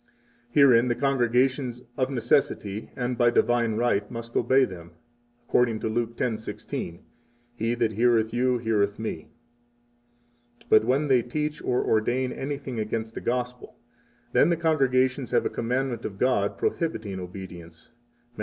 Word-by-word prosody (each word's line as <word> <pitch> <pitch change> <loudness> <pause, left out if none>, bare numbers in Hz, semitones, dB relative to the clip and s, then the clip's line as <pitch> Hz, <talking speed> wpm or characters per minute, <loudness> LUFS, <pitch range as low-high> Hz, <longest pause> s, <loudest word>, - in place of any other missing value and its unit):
Herein 125 -3 +5
the 120 - +1
congregations 130 -1 +1
of 130 0 0
necessity 115 -4 0
and 125 -1 -3
by 120 -1 +5
divine 120 -1 +2
right 105 -3 +1
must 115 0 -8
obey 130 +3 +4
them, 85 -5 -10 0.5
according 115 -3 +2
to - - -1
Luke 115 +1 -2
10:16: 110 -6 -4 0.5
He 115 0 -1
that 115 -2 +1
heareth 115 0 +2
you 125 +1 +2
heareth 105 -3 0
Me. 110 0 -5 1.3
23 - - -22
But 110 0 +6
when 135 +5 +1
they 130 -3 +4
teach 150 +5 -3
or 125 - 0
ordain 120 +4 +1
anything 135 -3 -5
against 110 +1 -3
the - - -6
Gospel, 125 0 -3 0.6
then 125 - +5
the 170 - +2
congregations 135 -5 +1
have - - +1
a - - -1
commandment 120 0 -2
of 100 - -5
God 100 -4 +1
prohibiting 110 - -2
obedience, 90 -3 -10 0.4
Matt. - - -14
120 Hz, 145 wpm, -26 LUFS, 110-130 Hz, 1.3 s, But